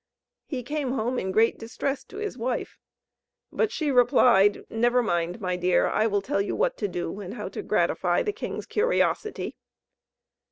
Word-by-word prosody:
He 260 -5 -4
came 285 0 -2
home 245 +1 -1
in 190 - -2
great 225 +4 +3
distress 260 +4 -3
to - - -12
his 420 0 -4
wife; 245 +1 -3 0.7
but 440 - 0
she 310 -10 -1
replied: 245 -5 +4
"Never 240 +2 +2
mind, 175 -1 -1
my 180 -3 -1
dear. 180 0 +2
I 220 - +2
will 205 -2 0
tell 200 - 0
you 200 - -2
what - - +1
to 205 - -1
do, 180 +1 -4
and 200 +2 -7
how - - -5
to - - -6
gratify - - +1
the 420 -3 -1
king's - - -5
curiosity." 435 -1 0
235 Hz, 170 wpm, -26 LUFS, 200-280 Hz, 0.7 s, replied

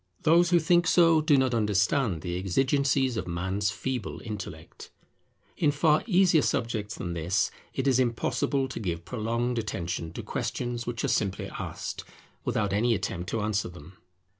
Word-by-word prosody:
Those 170 +2 +5
who 175 - +5
think 175 +1 +3
so 165 -2 +5
do 150 -2 +4
not 130 -2 +2
understand 105 - +1
the 85 -1 -3
exigencies 130 +6 +1
of - - -3
man's 95 +4 -1
feeble 125 0 -4
intellect. 105 -4 -8 0.7
In 155 - +3
far 150 +1 +3
easier 180 -6 +4
subjects 115 -5 -1
than 85 -2 -4
this, 90 +6 0 0.2
it 135 - -1
is 130 -2 +4
impossible 130 +2 0
to 130 - -5
give 85 -5 -3
prolonged 115 +2 -1
attention 85 -6 -4
to - - -6
questions 120 -1 -3
which 120 -2 -3
are - - +1
simply 100 -3 -1
asked, - - -6 0.4
without 100 -2 0
any 115 +3 +2
attempt 90 -3 -4
to 115 - -1
answer 105 -2 -1
them. 90 +2 -13
115 Hz, 160 wpm, -27 LUFS, 95-140 Hz, 0.7 s, Those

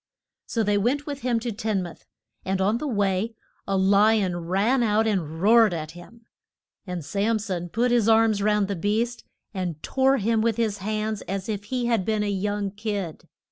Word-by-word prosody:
So 230 - 0
they 205 -1 +2
went 270 +8 0
with 285 -2 -5
him 240 -2 +1
to 240 0 -3
Tin 215 -3 -1
muth. 175 - -11 0.4
And 190 0 -1
on 205 +5 +1
the 300 - -3
way 205 -1 0 0.3
a 195 -1 +1
li 205 +3 +4
on 180 -2 -1
ran 210 +8 +2
out 220 -1 +2
and 165 -7 -1
roared 215 0 +5
at 155 -1 -5
him. 225 +7 -14 0.6
And 180 -4 -5
Sam 210 +5 0
son 185 -5 -4
put 240 +7 +1
his 230 -2 +3
arms 220 -2 +4
round 210 -1 +2
the 200 - -2
beast 220 +6 -1 0.3
and 175 -6 -4
tore 270 +1 +2
him 225 0 +1
with 225 -1 +1
his 220 -3 0
hands 215 +1 -2
as 195 0 -3
if 205 -2 -4
he 250 +2 -2
had 230 -5 +1
been 215 +1 0
a 205 - -1
young 205 0 -2
kid. 205 -5 -5
210 Hz, 195 wpm, -25 LUFS, 195-230 Hz, 0.6 s, roared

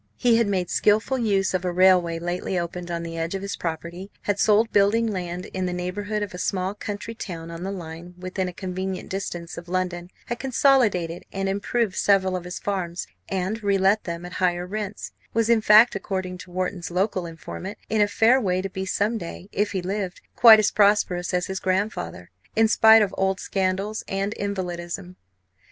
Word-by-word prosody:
He 240 -2 +4
had 230 -2 +2
made 185 -3 -1
skilful 220 +5 +2
use 195 -5 +1
of 185 -1 0
a 180 - -1
railway 180 -2 +4
lately 175 +2 -3
opened 175 0 -4
on 170 -1 -3
the 165 0 -5
edge 165 +3 -2
of 195 - -4
his 200 - -3
property; 170 +3 -5
had 205 -1 -1
sold 220 +2 +4
building 205 +3 +4
land 180 -4 -3
in 185 -1 -1
the 180 - -2
neighbourhood 205 +4 -3
of 205 - -6
a 180 - -7
small 185 0 -1
country 205 +2 -6
town 170 -7 -7
on 165 0 -7
the 190 +2 -3
line, 175 -1 -8
within 185 +1 -3
a - - -4
convenient 185 +1 -5
distance 175 -4 -5
of 170 0 -13
London; 180 -1 -2 0.2
had 240 - -4
consolidated 235 - +2
and 195 0 -2
improved 200 +1 -1
several 190 -2 +3
of 180 -1 -4
his 180 - -5
farms 180 -4 -3 0.2
and 195 +4 -2
relet 200 0 +2
them 170 0 -5
at 180 - -8
higher 175 -1 0
rents; 210 +1 -5 0.2
was, 230 0 +3
in 230 -2 +4
fact, 215 +3 +7
according 185 -2 -4
to 180 - -11
Wharton's 180 0 -3
local 185 0 -1
informant, 185 +5 -7
in 220 -1 +1
a 205 - +5
fair 230 +5 +4
way 185 -4 +1
to 195 - -4
be 190 0 -4
some 215 +4 0
day, 175 +2 -8
if 205 +1 0
he 190 -2 -2
lived, 190 -1 -3 0.2
quite 225 -2 +9
as 215 -1 +2
prosperous 200 -4 +2
as 180 0 0
his 190 -1 -4
grandfather, 190 +4 -2 0.2
in 225 0 +5
spite 220 0 +7
of 200 - -2
old 190 0 +1
scandals 195 +2 -1
and 195 +2 -2
invalidism. 180 -2 -4
190 Hz, 195 wpm, -24 LUFS, 180-205 Hz, 0.2 s, quite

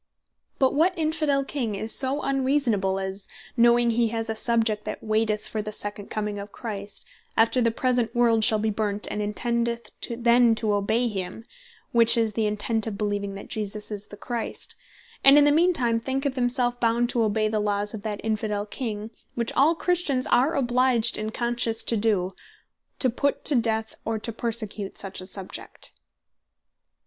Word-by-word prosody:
But 265 -1 +3
what 345 +5 +2
Infidel 305 -3 0
King 240 -8 -3
is 220 +3 -2
so 275 +2 0
unreasonable, 260 -8 +1
as 190 +1 -5 0.3
knowing 235 0 +4
he 230 0 +2
has 225 0 -2
a - - -3
Subject, 220 -2 +1
that - - -5
waiteth 215 -1 0
for 215 - -3
the 215 0 -5
second 205 -1 -4
comming 210 -1 -3
of 200 0 -8
Christ, 205 -3 -5 0.3
after 230 +3 +4
the 230 - +3
present 245 0 0
world 230 -2 +3
shall 215 - +6
be 215 +1 0
burnt, 210 -1 -2
and 210 - -2
intendeth 235 +2 -1 0.2
then 235 0 +4
to 220 -2 0
obey 220 +4 +1
him 195 +1 -5 0.5
(which 235 0 +6
is 225 -2 +1
the 220 0 0
intent 215 +1 -1
of 215 - -3
beleeving 205 -1 -2
that 195 - -9
Jesus 210 0 -5
is 210 0 -6
the 205 - -11
Christ,) 235 +1 -4 0.5
and 275 +1 +8
in 295 - +7
the 290 - +5
mean 340 +5 +4
time 240 -8 +1
thinketh 270 +3 -1
himself 245 -1 0
bound 235 +1 +2
to 240 - +1
obey 215 0 +1
the 215 0 -1
Laws 205 0 -1
of 215 - -6
that 210 -1 -4
Infidel 210 -1 -1
King, 215 -1 -5 0.2
(which 235 -1 0
all 305 +5 +4
Christians 330 -7 +1
are 280 +7 +3
obliged 245 -2 +3
in 215 0 -2
conscience 235 -1 -1
to 230 - +1
doe,) 205 -4 +1 0.6
to 255 - +1
put 280 +4 -1
to 300 - +7
death, 225 -2 0
or 225 0 -2
to 230 +2 -4
persecute 220 -3 -2
such 195 -1 -3
a 185 - -8
Subject? 190 -1 -5
225 Hz, 175 wpm, -25 LUFS, 210-245 Hz, 0.6 s, and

